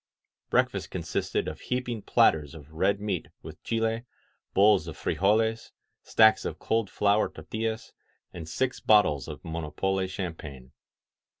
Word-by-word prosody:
Breakfast - - +1
consisted - - -2
of - - -5
heaping 125 -3 -3
platters 75 -5 +2
of 75 -1 -13
red 100 +5 +1
meat 100 -4 -3 0.2
with - - -10
chiley 115 +1 -1 0.5
bowls 100 -4 +5
of 80 - -7
frijoleSy 110 +3 +1 0.3
stacks 110 0 +4
of - - -4
cold 110 -3 -1
flour 105 +1 +2
tortiUaij 110 0 -4 0.4
and 80 -2 -8
six 130 +6 -1
bottles 80 -10 +3
of - - -9
Monopole 85 +4 -2
Champagne. 80 -9 -7
100 Hz, 125 wpm, -27 LUFS, 80-110 Hz, 0.5 s, bowls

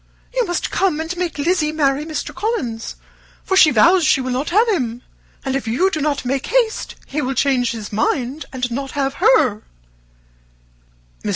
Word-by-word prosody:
You - - 0
must 350 - -2
come 370 -6 +1
and 325 +2 -3
make 350 -3 -3
Lizzy 305 0 +1
marry 295 -1 0
Mr. 315 - -4
Collins, 265 - -3 0.5
for 380 - 0
she 335 -4 +7
vows 335 - +5
she 305 - +4
will 255 -1 -3
not 260 +4 -1
have 430 +7 +3
him; 245 - -1 0.4
and 265 0 -1
if 270 -4 -3
you 350 +13 +2
do 310 - -2
not 285 -2 -1
make 265 +1 -1
haste 475 -3 0
he 300 +2 -3
will 265 0 -2
change 255 -2 +2
his 215 -3 -6
mind 255 +7 -1
and 250 -2 -3
not 270 +2 -4
have 275 -1 -1
her." 260 -6 +4 1.6
Mr. - - -2
280 Hz, 180 wpm, -19 LUFS, 255-345 Hz, 1.6 s, she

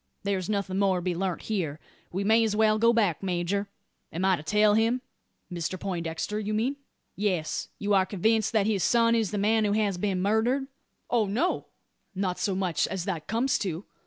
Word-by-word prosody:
There's 195 -2 -1
nothing 200 -2 -1
more 195 -2 +3
to - - -3
be 180 0 0
learnt 185 0 -2
here. 165 -9 -2 0.3
We 190 +3 -2
may 220 +3 +4
as 215 -2 0
well 215 0 +3
go 230 +1 +5
back, 210 -9 +1
major. 190 +2 -1 0.4
Am 175 +4 -2
I 190 -1 +4
to 150 - -8
tell 210 +6 +3
him?" 225 +4 +2 0.5
"Mr 175 +2 -3
Poindexter, 175 +2 -3
you 215 0 -2
mean?" 250 +6 0 0.4
"Yes. 185 -6 -1
You 205 0 0
are 190 -1 +4
convinced 215 +3 +1
that 215 -3 +3
his 205 -4 +1
son 230 -1 +4
is 225 -4 +1
the 210 - -3
man 215 +2 +2
who 205 -1 +1
has 205 -4 0
been 195 -1 0
murdered?" 220 +7 +1 0.5
"Oh, 230 -4 +2
no; 250 - 0 0.5
not 185 -1 -1
so 200 -5 0
much 185 -4 0
as 190 -2 -4
that 170 -6 -4
comes 235 +5 +1
to. 185 -1 -3
200 Hz, 195 wpm, -27 LUFS, 185-220 Hz, 0.5 s, go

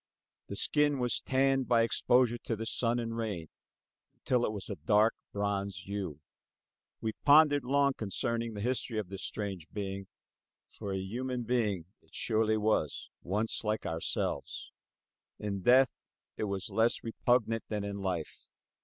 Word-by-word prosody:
The - - -5
skin 145 -1 +2
was 125 -2 0
tanned 135 0 +2
by 115 -2 +4
exposure 120 +1 +3
to 115 -1 -2
sun 115 +1 +1
and 115 -1 -3
rain 105 -8 -3 0.7
until 125 -1 +1
it - - -2
was 100 -3 -6
a 100 - -4
dark 105 +3 +3 0.2
bronze 100 -2 -2
hue. 95 -7 -4 0.8
We 110 - -1
pondered 145 -1 +6
long 140 +2 +3
concerning 115 +1 -2
the 100 - -4
history 120 -1 -1
of 105 -4 -2
this 95 0 -6
strange 95 -6 -4
being; 100 -1 -4 0.6
for 100 - -6
a 95 - -1
human 120 +6 -3
being 110 -7 0 0.2
it - - -19
surely 110 -1 +2
was; 105 -8 0
once 105 +7 -1
like 110 0 -1
ourselves. 80 0 -3 0.7
In 100 -2 -3
death 130 +5 +6 0.4
it - - -2
was 100 0 -3
less 115 +4 +2
repugnant 115 0 +1
than 105 -2 -2
in 100 0 -4
life. 90 -5 -4
110 Hz, 145 wpm, -31 LUFS, 100-120 Hz, 0.8 s, pondered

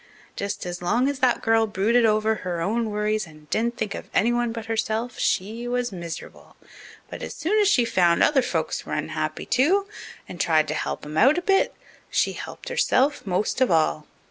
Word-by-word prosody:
Just 200 -1 -4
as 175 0 -5
long 235 +9 +1
as 285 -1 -2
that 250 -2 +2
girl 225 0 +3
brooded 225 +4 +2
over 215 0 +2
her 175 -2 -3
own 220 +6 0
worries 210 -1 -1
and 155 -1 -16
didn't 235 +2 0
think 210 -2 -2
of - - -8
anyone 240 +1 +2
but 225 -2 -6
herself 225 +1 -2
she 225 +6 -1
was 245 -1 -1
miserable. 170 -3 -8 0.6
But - - -7
as - - -6
soon 375 +9 +1
as 410 - +3
she 250 -12 +4
found 175 -6 +3
other 285 -3 +4
folks - - -2
were - - -6
unhappy, - - -3
too, 365 +10 +2 0.4
and 175 - -5
tried 155 -2 +3
to - - 0
help - - -4
'em 150 +1 -6
out 275 +6 +5
a - - 0
bit, 390 0 +2 0.3
she - - +1
helped - - -8
herself 275 -4 +1
most 190 +7 -1
of 260 - +4
all. 155 -2 +1
220 Hz, 195 wpm, -24 LUFS, 185-245 Hz, 0.6 s, out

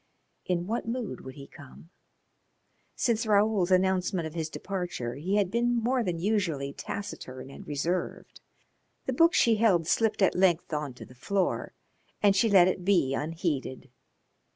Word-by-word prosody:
In 175 -1 -1
what 225 +3 -3
mood 235 -2 -4
would 130 0 -9
he 140 - -10
come? 140 +5 -15 1.0
Since 225 -2 0
Raoul's 205 -3 +3
announcement 185 -1 +1
of 160 - -6
his 160 -2 -3
departure 175 -11 -4
he 175 +9 -2
had 200 -3 +1
been 240 +1 +1
more 245 +2 +1
than 180 -5 -2
usually 165 -8 -1
taciturn 135 -11 -7
and - - -12
reserved. 165 +5 -3 0.6
The 260 - -1
book 330 +7 +4
she 230 -2 +4
held 195 -7 +3
slipped 220 +3 +1
at 190 - +4
length 180 -3 +2
on 150 -4 -3
to - - -10
the - - -16
floor, 190 +9 -2 0.4
and 200 -1 +4
she 220 +4 +3
let 185 -3 +6
it 185 0 -2
he 175 -9 +3
unheeded. 150 -3 -3
185 Hz, 155 wpm, -28 LUFS, 155-210 Hz, 1.0 s, let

